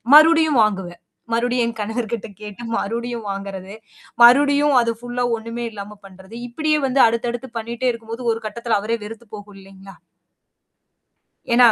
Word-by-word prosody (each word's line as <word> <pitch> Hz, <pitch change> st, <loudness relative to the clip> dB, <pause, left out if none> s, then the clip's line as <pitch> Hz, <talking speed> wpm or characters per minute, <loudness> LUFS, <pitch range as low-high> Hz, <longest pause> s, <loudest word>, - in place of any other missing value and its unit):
மறுபடியும் 315 Hz, -3 st, +6 dB
வாங்குவேன். 190 Hz, -4 st, -2 dB, 0.3 s
மறுபடியும் 245 Hz, +1 st, +1 dB
என் 230 Hz, -1 st, -5 dB
கணவர்கிட்ட 225 Hz, 0 st, -3 dB
கேட்டு 210 Hz, +2 st, -9 dB
மறுபடியும் 235 Hz, 0 st, -3 dB
வாங்குறது. 195 Hz, 0 st, -6 dB, 0.5 s
மறுபடியும் 285 Hz, +3 st, +6 dB
அது 230 Hz, 0 st, 0 dB
ஃபுல்லா 245 Hz, 0 st, -2 dB
ஒண்ணுமே 230 Hz, +1 st, -5 dB
இல்லாம 205 Hz, 0 st, -9 dB
பண்றது. 190 Hz, +2 st, -16 dB, 0.2 s
இப்படியே 305 Hz, +4 st, +1 dB
வந்து 265 Hz, +1 st, +3 dB
அடுத்தடுத்து 235 Hz, +2 st, -2 dB
பண்ணிட்டே 235 Hz, +3 st, -2 dB
இருக்கும்போது 230 Hz, +1 st, -8 dB
ஒரு 225 Hz, -, -6 dB
கட்டத்தில 235 Hz, -1 st, -1 dB
அவரே 230 Hz, +2 st, -1 dB
வெறுத்து 225 Hz, +2 st, -10 dB
போகும் 205 Hz, -1 st, -12 dB
இல்லைங்களா? 195 Hz, 0 st, -14 dB, 1.6 s
ஏன்னா 240 Hz, 0 st, +7 dB
230 Hz, 135 wpm, -21 LUFS, 210-245 Hz, 1.6 s, ஏன்னா